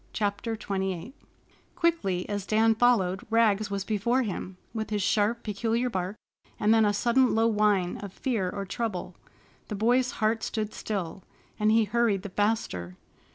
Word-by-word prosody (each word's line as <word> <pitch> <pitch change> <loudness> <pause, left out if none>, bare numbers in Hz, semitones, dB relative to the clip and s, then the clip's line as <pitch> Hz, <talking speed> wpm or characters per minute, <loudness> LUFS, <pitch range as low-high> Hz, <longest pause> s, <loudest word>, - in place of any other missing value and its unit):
CHAPTER 205 +2 -1
XXVIII 190 0 -3 0.6
Quickly 325 - 0
as 205 -1 -3
Dan 225 +1 +4
followed, 215 -5 +2
Rags 215 -2 +3
was 200 -1 -2
before 230 +5 +1
him, 190 -3 -5 0.2
with 220 -1 -3
his 210 -2 -1
sharp, 215 +3 +1
peculiar 230 +4 -1
bark, 185 +1 -2 0.4
and 210 +1 +4
then 225 -1 +5
a 205 - +3
sudden 240 +5 +3
low 225 0 +3
whine 210 -5 +2
of 200 -2 -7
fear 220 -5 -1
or 200 +1 -4
trouble. 210 -1 -4 0.5
The 210 - -4
boy's 245 +4 +2
heart 220 +1 0
stood 215 -1 -3
still, 190 -4 -4 0.4
and 215 0 +3
he 225 0 +5
hurried 210 -2 +1
the 205 - -5
faster. 185 - -1
210 Hz, 155 wpm, -27 LUFS, 195-230 Hz, 0.6 s, then